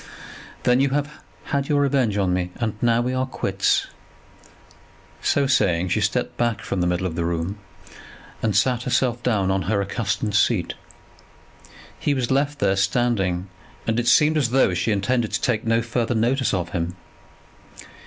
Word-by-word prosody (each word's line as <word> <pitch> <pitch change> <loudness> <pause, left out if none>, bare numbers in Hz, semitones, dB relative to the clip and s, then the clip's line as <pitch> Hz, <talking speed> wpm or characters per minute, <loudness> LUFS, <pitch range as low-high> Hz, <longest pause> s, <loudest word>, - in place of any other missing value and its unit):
"Then 125 +1 +3
you 135 +1 +3
have 145 +2 -1 0.3
had 140 -1 -2
your 145 -1 +3
revenge 130 -7 +1
on 95 -3 +1
me, 90 0 -1
and 110 -3 -2
now 120 0 +3
we 125 +1 -1
are 130 0 -1
quits." - - 0 1.4
So 140 - +2
saying, 90 -9 +2
she - - +1
stepped - - -1
back 120 -2 0
from 95 - -2
the 90 - +1
middle 90 +1 -1
of 90 - -2
the 85 - -2
room, 85 +4 -2 0.8
and 110 -4 0
sat 125 +4 +2
herself 125 -1 0
down 100 -6 +1
on 95 0 0
her 105 -2 +2
accustomed 105 +1 -2
seat. 105 -3 +2 1.3
He 145 - 0
was 125 -2 -1
left 145 +2 +1
there 100 -5 +2
standing, 95 -3 0 0.4
and 115 +1 0
it 120 - -2
seemed 150 +5 +5
as 135 -6 +1
though 125 -6 +3
she 90 +4 0
intended 110 +3 0
to - - 0
take 115 -3 0
no 115 0 +2
further 120 0 -1
notice 125 +4 +1
of 90 -3 -2
him. 85 +1 -3
115 Hz, 170 wpm, -23 LUFS, 95-130 Hz, 1.4 s, seemed